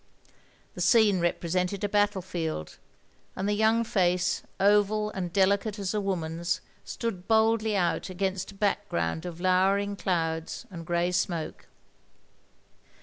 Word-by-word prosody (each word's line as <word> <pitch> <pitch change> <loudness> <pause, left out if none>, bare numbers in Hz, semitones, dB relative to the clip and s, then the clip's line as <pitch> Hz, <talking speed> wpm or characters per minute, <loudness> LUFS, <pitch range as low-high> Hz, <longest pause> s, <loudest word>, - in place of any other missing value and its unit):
The - - -6
scene 215 -5 +5
represented 180 +3 -1
a - - +2
battle 205 -2 +1
field, 160 - -4 0.6
and 190 - -2
the 205 0 0
yotmg 225 +1 +3
face, 180 -3 +1 0.2
oval 210 +1 +3
and 180 -4 -4
delicate 200 +3 +2
as 195 -1 -2
a 210 - 0
woman's, 170 -3 -2 0.2
stood 205 -6 -5
boldly 220 -1 +3
out 175 +1 0
against 190 +1 -2
a - - -16
background 190 - -1
of 170 -1 -7
lowering 195 +2 +2
clouds 165 -4 -2
and 165 -2 -8
grey 175 0 +1
smoke. 175 -3 -2
190 Hz, 130 wpm, -28 LUFS, 175-205 Hz, 0.6 s, scene